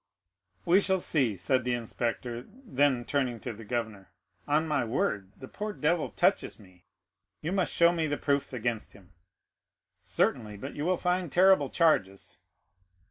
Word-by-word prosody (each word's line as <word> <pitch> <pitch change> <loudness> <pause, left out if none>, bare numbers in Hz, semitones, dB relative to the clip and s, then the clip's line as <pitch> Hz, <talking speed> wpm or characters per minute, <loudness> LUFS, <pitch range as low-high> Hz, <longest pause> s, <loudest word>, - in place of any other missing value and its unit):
"We 180 +4 +5
shall 190 -1 +2
see," 135 - +1
said 130 +8 +1
the 125 0 0
inspector; 120 +1 -3
then, 145 - 0
turning 130 -5 -1
to 120 - -5
the 110 +2 -11
governor, 110 -4 -4 0.4
"On 155 +2 +2
my 150 -4 +1
word, 105 -4 -1
the 130 - -10
poor 210 +6 -5
devil 160 -1 0
touches - - +1
me. 90 -3 -19 0.6
You 165 - -2
must 185 -2 0
show 170 0 +5
me 165 -2 -1
the 145 0 -1
proofs 140 -1 0
against 120 -3 -3
him." 95 -3 -18 0.9
"Certainly; 105 -2 0
but 135 +8 -7
you 145 - -4
will 185 0 +2
find 180 -3 -1
terrible 185 -6 +5
charges." 100 - +1
135 Hz, 155 wpm, -29 LUFS, 115-170 Hz, 0.9 s, We